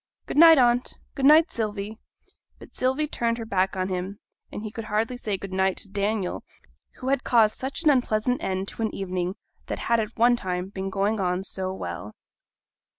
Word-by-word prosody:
'Good - - -5
night, 325 0 +9
aunt, 245 -1 +2 0.2
good 270 0 +2
night, 310 +3 +6
Sylvie!' 215 -1 -4 0.6
But - - -15
Sylvia 265 +4 +1
turned 235 -5 -1
her 230 - -5
back 190 -3 0
on 185 0 -1
him, 185 +2 -4 0.3
and 210 - -6
he 215 - -5
could 225 0 -6
hardly 220 +4 -1
say 210 -5 -3
'good 190 0 -8
night' 190 0 +1
to 200 - -4
Daniel, 200 -1 -2 0.5
who 255 - -4
had 275 -1 +1
caused 220 -3 +3
such 270 +5 -3
an 305 - +6
unpleasant 245 -2 +1
end 190 0 -2
to - - -8
an 220 - -1
evening 185 -1 -3 0.3
that - - -3
had 235 -1 +1
at 215 +1 -4
one 240 +1 +5
time 185 -4 -3
been 195 -1 -4
going 200 +3 0
on 180 0 0
so 190 -1 -3
well. 90 - -6
210 Hz, 195 wpm, -25 LUFS, 190-240 Hz, 0.6 s, night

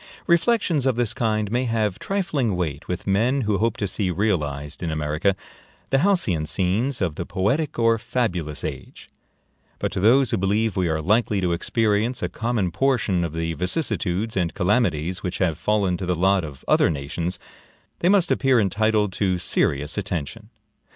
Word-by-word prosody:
Reflections 170 - +2
of 130 - +2
this 120 -1 -1
kind 110 -4 -1
may 125 +2 +1
have 110 -5 -1
trifling 150 - -1
weight 80 -5 -3
with 90 - -4
men 115 +8 +2
who 105 -4 0
hope 115 +1 0
to 100 - -1
see 95 0 -2
realized 75 -7 -2
in 85 - -2
America 75 +5 0 0.6
the 135 - +4
halcyon 140 - +2
scenes 105 - 0
of 90 -5 0
the - - -4
poetic 135 +11 -1
or 115 -1 +3
fabulous 105 - -2
age; 70 -4 -7 0.7
but - - -2
to - - -3
those 120 +5 +4
who - - +1
believe 105 +3 +1
we 90 -3 +1
are 80 -1 -1
likely 105 +3 +2
to 90 -2 0
experience 110 +6 0
a - - -1
common 110 -5 -1
portion 105 -4 +1
of 85 - -2
the 80 0 -2
vicissitudes 95 - -1
and 90 -3 -1
calamities 90 -4 0
which 90 - -3
have 85 -4 +1
fallen 100 0 0
to 90 - -5
the 90 - +1
lot 95 +2 +2
of 70 -4 -9
other - - +4
nations, 80 +4 -3 0.6
they 175 - +2
must 190 -3 +3
appear 135 -3 +3
entitled 105 0 +1
to 95 -2 0
serious 75 -1 0
attention. 90 +4 -5
100 Hz, 170 wpm, -23 LUFS, 85-115 Hz, 0.7 s, the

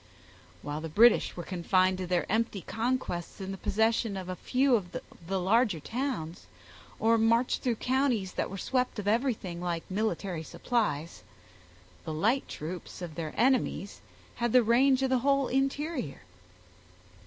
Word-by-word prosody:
While 145 +1 -4
the 160 - -5
British 225 +6 +4
were 175 - -4
confined 185 +1 +1
to 185 - -3
their 180 -1 +1
empty 220 -2 0
conquests 225 -6 -3
in 190 0 -5
the 195 - -5
possession 220 -1 +1
of 185 -1 -6
a 185 - -3
few 260 +6 +1
of 185 -5 -3 0.3
the 190 +1 0
larger 205 -1 +2
towns, 225 - -4 0.5
or 225 +1 +3
marched 230 +2 +2
through 245 -3 0
counties 250 -6 0
that - - -2
were 195 - -6
swept 250 +5 -1
of 205 -1 -4
everything 215 -7 0
like 170 -2 -2
military 190 -4 -1
supplies, 160 - -2 0.8
the 160 - -4
light 230 - +1
troops 175 +3 -7
of 170 -3 -6
their 155 -1 -5
enemies 245 -5 +1 0.4
had 240 -2 0
the 250 -1 +7
range 260 +4 +4
of 265 - +1
the 260 - +3
whole 275 +1 +2
interior. 270 - -1
215 Hz, 155 wpm, -29 LUFS, 180-250 Hz, 0.8 s, the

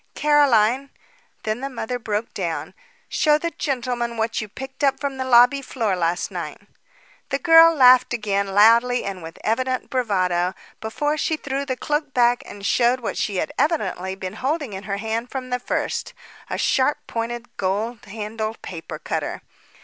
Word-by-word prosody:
"Caroline" 275 -4 +3 0.5
Then 215 +1 -2
the 275 - -3
mother 245 -1 -4
broke 215 -1 -3
down. 170 -4 -3 0.3
"Show 300 -1 +3
the 335 +2 -3
gentleman 245 -5 -2
what 225 +1 -1
you 215 - -5
picked 265 +6 -8
up 275 -1 +3
from 280 -2 -3
the 260 - -2
lobby 250 +2 +5
floor 225 -7 -1
last 175 0 -1
night." - - -5 0.7
The 275 - 0
girl 330 +1 +7
laughed 255 -2 +6
again, 200 -4 0
loudly 230 +5 +5
and 195 -2 -5
with 165 +1 -9
evident 255 +3 -1
bravado, 185 -7 0 0.2
before 290 +7 -1
she 315 - 0
threw 280 -1 -3
the 260 -2 -2
cloak 295 0 -2
back 245 0 +4
and 200 -1 -9
showed 245 +4 +3
what 230 - -3
she 205 - -2
had 290 +10 -1
evidently 190 - 0
been 190 -1 -6
holding 280 -3 -1
in 190 +1 -7
her 200 -1 -2
hand 225 +3 -3
from 255 -2 -6
the 250 - 0
first, - - -3 0.3
a - - -2
sharp 265 +2 +2
pointed, 235 +1 -5
gold 210 +4 -2
handled 215 +1 -5
paper 165 -3 -7
cutter. - - -4
240 Hz, 165 wpm, -22 LUFS, 210-270 Hz, 0.7 s, girl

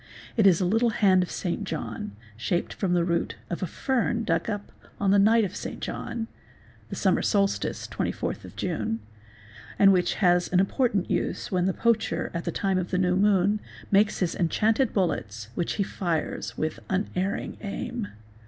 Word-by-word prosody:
It 215 -4 +5
is 180 -4 +5
a 185 - +1
little 225 +6 +3
hand 195 -5 +4
of 180 - -2
St. 180 +3 -2
John 120 - -5 0.2
shaped 170 - -1
from 185 -3 -1
the 175 - +3
root 170 -1 0 0.2
of 170 - -3
a 185 - -1
fern 235 - 0
dug 225 - 0
up 205 -1 -4 0.3
on 195 -1 +2
the 200 - +5
night 220 +3 +5
of 190 - -6
St. - - -5
John 230 -1 -4 0.6
(the - - -5
summer - - +2
solstice, 200 -2 0
24th - - -3
June), 110 - -2 0.8
and 195 -1 +7
which 180 -1 +2
has 175 -3 +3
an 180 - +4
important 200 0 +1
use - - -1
when 180 -1 +2
the - - +3
poacher, 230 -1 +1
at 170 -1 -3
the - - -1
time 195 -2 0
of 180 - -3
the 180 - 0
new 180 -1 +2
moon, 200 +1 +3 0.3
makes 205 +1 +3
his 175 -3 +1
enchanted 215 +7 +2
bullets 110 - -1
which 175 - -1
he 205 - 0
fires 170 -5 -3
with 155 0 -2
unerring 190 0 -1
aim. 215 +2 -4
190 Hz, 175 wpm, -26 LUFS, 175-210 Hz, 0.8 s, and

